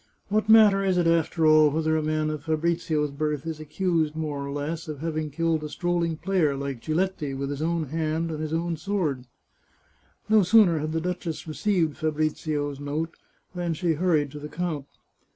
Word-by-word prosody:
What 215 +1 0
matter 210 -3 +7
is 190 -2 +1
it, 175 - +2
after 165 -1 +2
all, 155 -1 +6
whether 160 +1 0
a 155 - +1
man 155 0 0
of 150 -1 -6
Fabrizio's 160 -2 0
birth 150 0 -2
is 160 -2 -4
accused, 155 0 -1
more 150 -3 -3
or 140 - -5
less, 155 +4 -4
of 155 -2 -5
having 155 0 -3
killed 165 +1 0
a 150 - -4
strolling 170 -1 -1
player 170 -5 +1
like 135 -3 -4
Giletti 155 -3 -1
with 140 +1 -3
his 145 +1 -4
own 165 -2 -1
hand 160 +1 -1
and 155 - -4
his 155 -1 -3
own 165 0 -1
sword? 155 -8 -2 0.5
" - - -38
No 215 0 +5
sooner 185 -4 +5
had 155 +1 -3
the 165 - 0
duchess 175 -2 -4
received 165 -1 0
Fabrizio's 155 -2 -1
note, 150 +3 -3 0.4
than 175 -2 -2
she 170 0 +1
hurried 155 -4 +1
to 150 - -8
the 150 +1 -7
count. 160 -6 -3
160 Hz, 190 wpm, -26 LUFS, 150-170 Hz, 0.5 s, matter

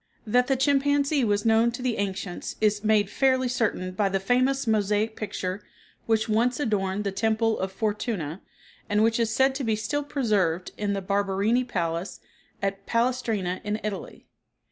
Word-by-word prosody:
That 245 +3 +3
the 270 - +2
chimpanzee 280 +1 +2
was 205 -1 +1
known 225 +1 +4
to 245 - -6
the 250 -3 0
ancients 195 -2 -4
is 210 -1 +1
made 215 -2 +3
fairly 260 +3 +2
certain 225 -7 -1
by 195 +2 0
the 195 0 0
famous 255 +7 +1
mosaic 215 0 +1
picture 195 -2 -4 0.5
which 220 0 +2
once 235 +4 +1
adorned 205 -6 0
the 200 - -1
temple 220 +2 +1
of 190 0 -2
Fortuna, 205 - -3 0.5
and 210 +1 +3
which 225 +1 +2
is 230 -1 +2
said 265 +4 +3
to 270 0 -4
be 225 -3 +1
still 285 +7 -2
preserved 205 - 0
in 205 -1 -1
the 195 -1 -3
Barberini 200 +5 +1
palace 170 -6 -3 0.4
at 195 0 -2
Palestrina 230 -6 0
in 210 +1 -2
Italy. 210 -2 -6
215 Hz, 165 wpm, -26 LUFS, 195-245 Hz, 0.5 s, known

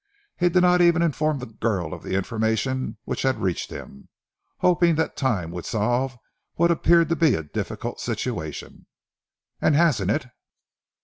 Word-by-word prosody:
He 175 0 +2
did 180 +1 +3
not 180 0 +5
even 170 -1 +4
inform 155 -2 0
the 125 - -6
girl 105 -7 -2
of - - -8
the 95 - -3
information 110 +5 -1
which - - -4
had 130 -1 +1
reached 90 -3 -2
him, 70 - -10 0.5
hoping 175 -2 +3
that 160 +1 -1
time 105 - -1
would 90 0 -6
solve 120 +4 0 0.4
what 170 +1 +3
appeared 170 0 +4
to 170 - +2
be 160 -5 +3
a 80 - -3
difficult 75 - -5
situation." 80 -2 -5 0.7
"And 150 - +3
hasn't 140 - +3
it?" 135 +5 0
130 Hz, 160 wpm, -24 LUFS, 105-170 Hz, 0.7 s, not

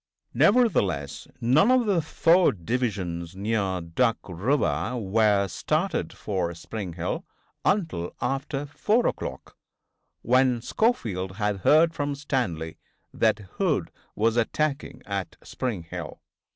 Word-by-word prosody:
Nevertheless 100 - +2
none 135 - +4
of 255 -2 +4
the 195 -5 +2
four 165 +1 +4
divisions 95 -5 -3
near 100 -2 -1
Duck 110 +9 +1
river 120 - 0
were 105 -1 +2
started 155 - -1
for 90 -5 -3
Spring 95 +1 -6
Hill 85 +1 -3 0.4
until 160 - 0
after 135 +2 -2
4 215 - +1
o'clock, - - -4 0.7
when 125 0 +3
Schofield 110 - 0
had 105 -1 0
heard 160 - +4
from 145 -2 -2
Stanley 90 - -2 0.3
that - - +2 0.2
Hood 155 - +1 0.2
was 115 +2 +1
attacking 145 +5 -1
at 100 -2 -4
Spring 115 -9 -3
Hill. 85 - -7
115 Hz, 110 wpm, -26 LUFS, 95-150 Hz, 0.7 s, none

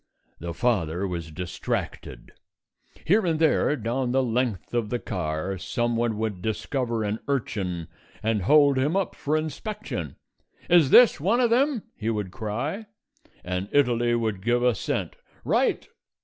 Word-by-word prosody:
The 85 +1 -5
father 95 -6 0
was 85 -3 -5
distracted. 90 +3 -5 0.7
Here 205 +6 +4
and 165 -3 +1
there, 155 -2 +3
down 120 +1 -2
the 135 0 +3
length 120 -5 -1
of 115 -3 0
the 120 - 0
car, 90 -1 -3
someone 120 +1 -1
would 105 -4 -3
discover 115 +2 -2
an 105 +1 -2
urchin 95 - -2 0.4
and 110 -1 +1
hold 140 +5 +5
him 145 +6 +1
up 195 -2 0
for 150 +2 -1
inspection. 155 - -5 0.6
"Is 170 -6 +6
this 240 - +7
one 200 - +2
of 240 -2 +3
them?" 265 -1 +2
he 110 - -3
would 105 -4 -2
cry, 125 - -4 0.6
and 90 +2 -3
Italy 120 -4 +3
would 110 -5 -1
give 120 +3 +1
assent. 125 -4 -1 0.3
"Right!" - - +1
120 Hz, 140 wpm, -25 LUFS, 100-145 Hz, 0.7 s, this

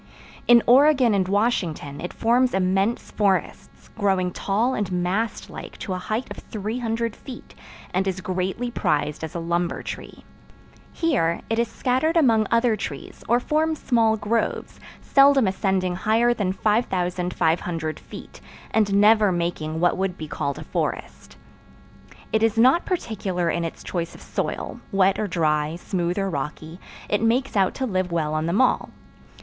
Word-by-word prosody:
In 240 -1 +7
Oregon 260 -2 +5
and 190 -2 +1
Washington 185 -9 -1
it 175 - -5
forms 245 +1 +2
immense 195 +4 0
forests, 200 -3 -2
growing 190 -3 +1
tall 215 +8 0
and 205 -5 -2
mast 185 +6 -1
like - - -9
to 190 - -4
a 185 - -3
height 215 +7 -2
of - - -7
300 225 +1 -3
feet, 260 -3 -11 0.4
and 190 +2 0
is 190 -1 -2
greatly 185 +6 -2
prized 150 -6 -1
as 160 +3 -6
a - - -2
lumber 170 +1 -1
tree. - - -8 0.7
Here 250 - 0
it 225 - +1
is 235 - +2
scattered 265 +9 0
among 225 -8 +4
other 230 -1 +3
trees, 210 - -7
or 240 +1 +4
forms 310 +4 0
small 225 -5 +2
groves, 225 +2 -2 0.2
seldom 275 -2 +5
ascending 190 -2 0
higher 230 +4 +2
than 200 -5 -1
5500 180 -6 -1
feet, - - -12 0.3
and 205 -3 +2
never 210 -1 +5
making 170 -2 -2
what 175 +1 +2
would 190 -1 -2
be 155 - -6
called 140 -1 -3
a - - -7
forest. - - -4 1.0
It 220 - +3
is 225 -1 +2
not 260 +9 +4
particular 190 - -1
in 170 - -1
its 165 - -6
choice 170 -2 -4
of - - -13
soil: - - -4
wet 195 -1 +3
or 215 - -1
dry, 155 -3 0
smooth 175 0 -2
or 195 -1 0
rocky, 155 +1 -5 0.3
it 205 - 0
makes 240 +4 +1
out 195 -2 +2
to 265 - -2
live 185 -5 -1
well 155 -3 -1
on 155 +1 -1
them 185 +8 +2
all. 255 - +2
195 Hz, 155 wpm, -23 LUFS, 175-230 Hz, 1.0 s, In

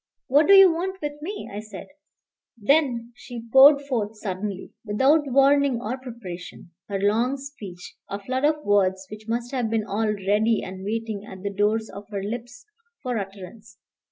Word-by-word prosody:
"What 290 +3 +4
do 395 - +7
you 390 -3 +8
want 375 +3 -3
with 295 -2 -5
me?" 405 +7 -6
I 205 - -4
said. 215 0 -9 0.7
Then 240 -1 +1
she 235 -2 -9
poured 280 +2 +8
forth 225 -6 -3
suddenly, 195 -1 -5
without 270 +8 +3
warning 275 -1 +4
or 235 +2 -3
preparation, 185 -9 -9 0.2
her 200 -1 -2
long 230 +7 +1
speech, 215 -11 -10
a 200 - -3
flood 255 +6 -3
of 300 0 +1
words 190 -2 +2
which 215 +1 -10
must 235 +1 -2
have 250 -5 -1
been 220 -1 0
all 215 +1 -1
ready 210 +2 +1
and 190 0 -8
waiting 220 0 -3
at 190 0 -10
the 200 0 -3
doors 215 +2 +1
of 200 +1 -10
her 200 -2 -4
lips 240 +3 -6 0.4
for 250 -4 -1
utterance. 200 +2 -10
225 Hz, 170 wpm, -24 LUFS, 205-270 Hz, 0.7 s, you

